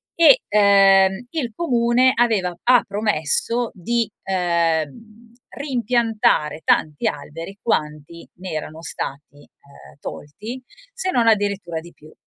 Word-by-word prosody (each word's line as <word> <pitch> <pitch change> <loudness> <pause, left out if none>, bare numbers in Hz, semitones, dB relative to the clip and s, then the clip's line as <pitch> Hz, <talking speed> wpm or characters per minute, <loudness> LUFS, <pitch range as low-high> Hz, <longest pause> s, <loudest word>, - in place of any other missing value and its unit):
e, 320 -5 +6
uhm, 195 0 +4
il 275 -8 -3
comune 250 -4 +2
aveva 210 -7 +1
ha 250 0 +5
promesso 210 +4 -1
di, 230 +4 -1
uhm, 180 +5 -2 0.2
reimpiantare 235 - 0
tanti 150 0 +1
alberi 165 +7 -6
quanti 150 -4 -3
ne 185 +1 -8
erano 155 +1 -6
stati, 145 -1 -6
uhm, 140 -1 -19
tolti 215 - -8 0.3
se 480 -6 -3
non 235 -2 +2
addirittura 200 -6 0
di 170 +2 -13
più. 155 +1 -18
200 Hz, 115 wpm, -21 LUFS, 160-235 Hz, 0.3 s, e